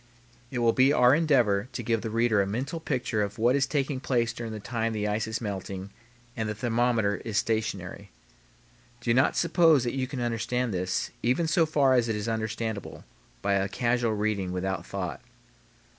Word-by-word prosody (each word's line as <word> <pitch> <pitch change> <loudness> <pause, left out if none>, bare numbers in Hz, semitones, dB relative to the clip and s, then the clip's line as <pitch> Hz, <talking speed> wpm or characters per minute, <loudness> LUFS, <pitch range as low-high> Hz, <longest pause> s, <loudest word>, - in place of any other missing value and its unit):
It 125 - -5
will 115 -1 +3
be 130 +2 +4
our 125 -2 +5
endeavor 125 -9 +2
to 120 - -4
give 115 -1 0
the 115 - -4
reader 115 -2 +2
a 95 - -1
mental 135 - -3
picture 125 -8 -1
of 100 +1 -3
what 120 +3 +3
is 140 0 +2
taking 135 -1 -1
place 120 -3 0
during 115 -1 -6
the 110 - -5
time 115 +1 -2
the 105 -1 -1
ice 105 +1 -1
is 110 +1 -3
melting 95 -2 -5 0.4
and 110 -2 -2
the 105 - -3
thermometer 115 -2 +1
is 110 -3 -4
stationary. 100 -3 -2 0.9
Do 120 -1 +1
not 130 +3 +3
suppose 165 -5 +4
that 120 - -2
you 130 -1 -1
can 135 0 -5
understand 120 0 -1
this, 90 0 -2
even 130 +9 +1
so 165 0 +3
far 140 -4 +3
as 120 -2 +3
it 110 - 0
is 105 +1 -4
understandable, 110 -1 -3 0.4
by 100 - +2
a 100 0 +1
casual 120 +1 0
reading 105 -3 -1
without 95 0 -3
thought. - - -4
115 Hz, 190 wpm, -27 LUFS, 105-125 Hz, 0.9 s, our